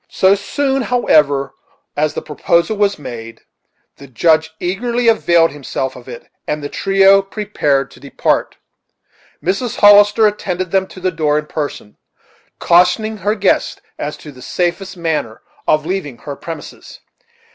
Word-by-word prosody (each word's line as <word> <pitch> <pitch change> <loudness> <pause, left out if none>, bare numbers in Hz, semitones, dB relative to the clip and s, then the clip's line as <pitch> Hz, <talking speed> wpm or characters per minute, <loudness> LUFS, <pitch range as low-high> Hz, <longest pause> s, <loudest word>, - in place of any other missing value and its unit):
So 190 +1 +3
soon, 270 +6 -1
however, 150 - +2 0.4
as 150 +1 0
the - - -4
proposal 170 +6 0
was 205 -1 +1
made, 115 -5 -9 0.6
the 140 - -13
Judge 160 +5 +2
eagerly 235 +7 -1
availed 170 -7 +3
himself 135 -2 -4
of 125 0 -13
it, 120 - -9 0.2
and 150 0 -3
the 145 - -4
trio 195 0 +4
prepared 195 -10 -1
to - - -16
depart. 140 - -1 0.9
Mrs. 200 +7 -1
Hollister 205 +1 +6
attended 185 -4 -2
them 190 -1 +1
to 185 - -12
the 185 0 -1
door 155 -3 0
in 150 - -2
person, 145 -9 -6 0.6
cautioning 180 +6 +2
her 205 +2 -1
guests 200 -3 0 0.2
as 150 +1 -4
to 150 - -11
the 130 -2 -15
safest 180 +5 -3
manner 155 -10 -3 0.2
of 155 0 +2
leaving 170 -8 -4
her 140 +3 -7
premises. 160 0 -10
175 Hz, 145 wpm, -16 LUFS, 150-200 Hz, 0.9 s, Hollister